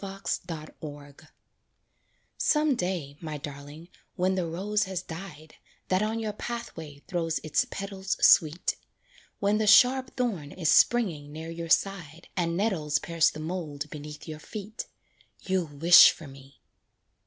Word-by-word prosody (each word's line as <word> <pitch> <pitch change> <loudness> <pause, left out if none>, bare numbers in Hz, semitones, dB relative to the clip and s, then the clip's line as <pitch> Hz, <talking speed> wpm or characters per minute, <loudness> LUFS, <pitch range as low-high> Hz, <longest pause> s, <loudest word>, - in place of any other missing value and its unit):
FOR 155 -6 -6 1.3
Some 300 -2 +2
day, 175 - -3
my 155 -2 -5
darling, 145 +3 -9 0.3
when 185 +1 +1
the 185 -2 -1
rose 205 +6 -1
has 190 -1 -4
died, 160 -3 -9 0.4
That 185 +1 +2
on 220 +1 -1
your 215 -2 -3
pathway 165 -11 -7
throws 170 -3 -1
its 155 -1 +1
petals 195 -1 -4
sweet, 160 +2 +4 0.6
When 205 +1 +1
the 215 - 0
sharp 255 +4 +5
thorn 195 - -2
is 165 -4 -1
springing 170 -12 +3
near 160 +2 -7
your 165 0 -6
side 170 -4 0
And 170 -2 -1
nettles 165 -8 0
pierce 165 0 +2
the - - -9
mould 155 -4 -5
beneath 150 +1 -9
your 155 -1 -7
feet, 215 +6 -7 0.5
You'll 185 -3 -1
wish 160 +4 +8
for 160 - -6
me. 135 0 -15
170 Hz, 135 wpm, -27 LUFS, 150-195 Hz, 1.3 s, wish